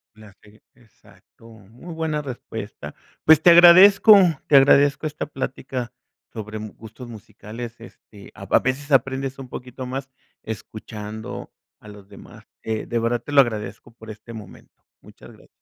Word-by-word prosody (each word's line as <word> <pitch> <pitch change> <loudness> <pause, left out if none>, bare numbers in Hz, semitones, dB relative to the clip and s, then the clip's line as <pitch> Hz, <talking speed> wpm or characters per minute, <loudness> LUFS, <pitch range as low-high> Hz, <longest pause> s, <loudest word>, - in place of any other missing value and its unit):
La 110 -2 -16
se 105 +1 -21
exacto, 115 0 -22
muy 115 - -13
buena 160 -2 -3
respuesta, 130 -4 -9 0.3
pues, 160 -1 +6
te 175 - +5
agradezco 185 +5 +8 0.3
te 145 - +3
agradezco 140 +2 +4
esta 150 - -6
plática 130 -3 -6 0.4
sobre 110 -1 -8
m 110 0 -7
gustos 115 +3 -12
musicales, 110 +1 -10
este, 105 -3 -16
a - - -12
v - - 0
a - - +6
veces 140 +3 -3
aprendes 135 0 0
un 130 -2 -10
poquito 125 +1 -9
más 135 +1 -6 0.3
escuchando 110 0 -9 0.3
a 105 - -14
los 105 -1 -14
demás, - - -16 0.2
eh, 110 -1 -4
de 120 - -3
verdad 115 +1 -1
te 145 - -9
lo 140 - +7
agradezco 110 -4 -5
por 115 -1 -15
este 110 +2 -11
momento, 110 -4 -14 0.2
muchas - - -16
gra - - -21
120 Hz, 160 wpm, -21 LUFS, 110-140 Hz, 0.4 s, agradezco